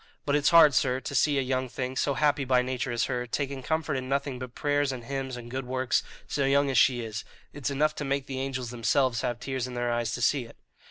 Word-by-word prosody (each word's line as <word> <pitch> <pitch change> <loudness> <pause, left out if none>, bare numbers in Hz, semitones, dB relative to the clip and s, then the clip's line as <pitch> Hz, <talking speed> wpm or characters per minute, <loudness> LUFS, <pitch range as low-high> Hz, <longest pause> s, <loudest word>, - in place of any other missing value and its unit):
But 145 - +1
it's 145 -1 +3
hard, 165 -4 +7
sir, 130 -1 +2
to 135 - -6
see 145 +2 +3
a 135 - +2
young 130 0 -1
thing, 130 +1 -4
so 140 +1 0
happy 145 -1 +2
by 125 -1 +3
nature 130 0 -2
as 120 0 0
her, 125 -2 -2
taking 140 +2 -3
comfort 160 +3 -1
in 130 -1 -3
nothing 140 -2 -1
but 125 -1 -8
prayers 145 -1 +1
and 125 -2 -6
hymns 135 0 -4
and 120 0 -9
good 130 0 -4
works, 130 -1 +1 0.3
so 140 - -1
young 140 +1 +3
as 130 - 0
she 125 -2 +4
is; 110 -2 -5 0.3
it's 145 -2 -3
enough 150 +2 +1
to - - -3
make 140 -1 -1
the 135 -1 -5
angels 130 -3 -3
themselves 120 0 +1
have 120 -1 -2
tears 130 -2 -3
in 125 - -7
their 120 0 -1
eyes 120 -1 -1
to 120 - -4
see 135 -2 +2
it." 115 - -15
130 Hz, 255 wpm, -28 LUFS, 125-140 Hz, 0.3 s, hard